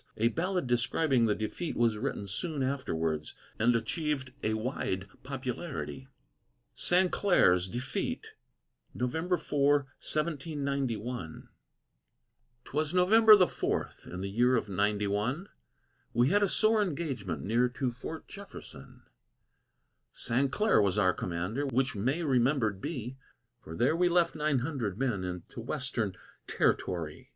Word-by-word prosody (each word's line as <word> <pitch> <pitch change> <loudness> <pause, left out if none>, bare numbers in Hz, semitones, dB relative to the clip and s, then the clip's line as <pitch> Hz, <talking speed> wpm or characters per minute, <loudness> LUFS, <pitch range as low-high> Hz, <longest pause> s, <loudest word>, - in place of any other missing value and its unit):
A 115 +2 +3
ballad 180 - -1
describing 120 +2 +2
the 105 - +2
defeat 130 +10 -4
was 115 -2 +3
written 125 -5 -3
soon 140 - -2
afterwards, 80 - -2 0.2
and 120 +2 +4
achieved 135 +2 -2
a 110 0 0
wide 110 -5 -2
popularity. 135 +1 -5 0.7
SAINCLAIRE'S 175 - +3
DEFEAT 205 - -3 0.7
[November 160 +9 0
4, 145 -2 +2 0.3
1791] 140 - -3 1.2
'Twas 155 +4 -1
November 215 +4 +8
the 185 -3 +5
fourth, - - -3
in 90 +1 -6
the 100 - -3
year 120 +4 +3
of 115 - 0
ninety 105 +2 +1
one, 115 - -1 0.7
We 120 +3 +4
had 205 +4 +3
a 200 - +3
sore 215 +1 +3
engagement 135 - -3
near 120 +4 +2
to 125 0 -2
Fort 155 +6 -8
Jefferson; 195 - -11 1.1
Sainclaire 140 - +2
was 100 0 +1
our 95 -3 +4
commander, 90 +11 -2
which 130 0 0
may 130 - 0
remembered 125 -7 +2
be, 130 -5 -5 0.5
For 80 - -8
there 125 - +2
we 175 +1 +3
left 175 -1 +3
nine 150 -4 +1
hundred 125 - -3
men 120 -7 0
in 90 -1 -4
t' 115 - -10
West'n 120 -6 -2 0.3
Ter'tory. 80 -4 -1
130 Hz, 125 wpm, -30 LUFS, 105-155 Hz, 1.2 s, November